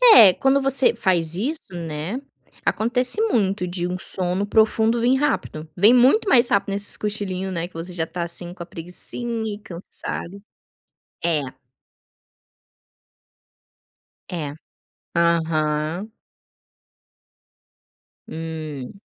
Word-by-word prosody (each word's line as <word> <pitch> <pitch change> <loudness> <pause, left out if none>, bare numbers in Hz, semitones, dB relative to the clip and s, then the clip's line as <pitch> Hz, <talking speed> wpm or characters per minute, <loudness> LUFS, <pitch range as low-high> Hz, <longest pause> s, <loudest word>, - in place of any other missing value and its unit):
É, 205 -6 +9
quando 270 +7 +2
você 270 -2 +3
faz 170 -6 0
isso, 265 - -4
né, 165 - -5 0.4
acontece 250 - +1
muito 200 - +1
de 175 0 -3
um 180 - -3
sono 185 +2 +5
profundo 220 +2 +2
vir 250 +2 +3
rápido. 160 - -2
Vem 210 +7 +6
muito 260 - +4
mais 240 -1 +5
rápido 200 0 +1
nesses 200 +1 -3
cochilinho, 195 -3 -3
né, 170 -1 -3
que - - -32
você 170 +2 -7
já 165 -2 -1
está 170 +1 -5
assim 175 +1 -4
com 175 - -8
a - - -11
preguicinha 220 +6 -5
e 205 - -13
cansado. 185 +1 -8 0.8
É. 165 -3 +2 2.9
É. 155 -5 -5 0.6
Aham. 165 +2 0 2.2
Hum. 160 -1 -7
185 Hz, 110 wpm, -22 LUFS, 170-225 Hz, 2.9 s, É